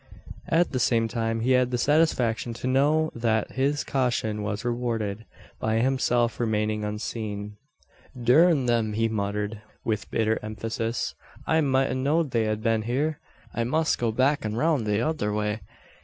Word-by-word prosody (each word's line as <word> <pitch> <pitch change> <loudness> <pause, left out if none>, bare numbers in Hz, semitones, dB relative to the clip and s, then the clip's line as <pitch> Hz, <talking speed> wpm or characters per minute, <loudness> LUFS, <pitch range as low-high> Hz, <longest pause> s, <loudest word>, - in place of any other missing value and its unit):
At 170 +2 +2
the 130 - -1
same 115 -1 +2
time 115 -1 -2
he 125 +3 +1
had 125 -1 +4
the 125 - -1
satisfaction 125 -5 +1
to 115 - -7
know 145 +5 +2
that 110 -2 0
his 140 +3 0
caution 120 -5 -1
was 105 +2 -3
rewarded, 115 -3 -2 0.3
by 110 0 0
himself 120 -1 +1
remaining 105 -2 0
unseen. 105 -1 -4 0.6
"Durn 140 +4 +4
them!" 115 -3 +1
he 115 +1 +1
muttered, 105 0 -2 0.2
with 110 -3 -2
bitter 110 0 +1
emphasis. 115 +2 -3 0.3
"I 160 0 +3
mout 135 -2 +2
a - - 0
know'd 140 +3 +1
they'd 115 -2 +1
a 110 0 0
bin 110 0 +1
hyur. 135 +7 -1 0.3
I 120 - 0
must 155 +6 +1
go 115 -2 +1
back 140 +5 +2
an 110 0 -2
roun' 150 -2 +1
the 105 -1 +1
tother 120 -4 0
way. 105 +1 -1
115 Hz, 160 wpm, -26 LUFS, 110-130 Hz, 0.6 s, had